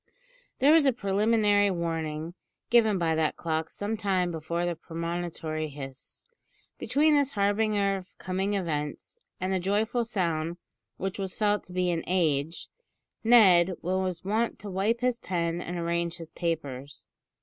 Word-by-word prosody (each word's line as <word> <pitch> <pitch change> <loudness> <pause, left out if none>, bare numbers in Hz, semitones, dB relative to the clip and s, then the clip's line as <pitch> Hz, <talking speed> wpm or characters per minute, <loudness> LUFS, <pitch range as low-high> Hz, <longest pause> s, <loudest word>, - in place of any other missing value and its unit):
There 285 +3 +5
was 320 -3 +5
a 265 - +4
preliminary 205 -1 +2
warning 165 -2 -3 0.4
given 220 -4 +5
by 165 -2 +1
that 160 -1 +1
clock 160 -1 -2
some 205 +2 -3
time 190 -4 0
before 170 +2 -2
the 175 -1 -1
premonitory 165 -1 -4
hiss. 135 -2 -9 0.5
Between 305 +2 +3
this 285 -2 +2
harbinger 205 -1 +1
of 185 -1 -12
coming 190 +2 -1
events, 155 - -3 0.2
and 185 +1 -1
the 190 - +1
joyful 215 +6 0
sound 170 -6 -1 0.4
which 195 +1 -4
was 190 -1 -4
felt 210 -1 +1
to 180 - -12
be 180 -1 +1
"an 165 -1 -2
age," 160 -3 0 0.6
Ned 190 -6 +6
was 185 0 -1
wont 220 +4 0
to 205 - -8
wipe 210 +6 0
his 250 -1 +1
pen 170 -3 -2
and 175 0 -5
arrange 170 0 -1
his 165 -1 -9
papers. 145 -5 -4
185 Hz, 150 wpm, -28 LUFS, 165-205 Hz, 0.6 s, Ned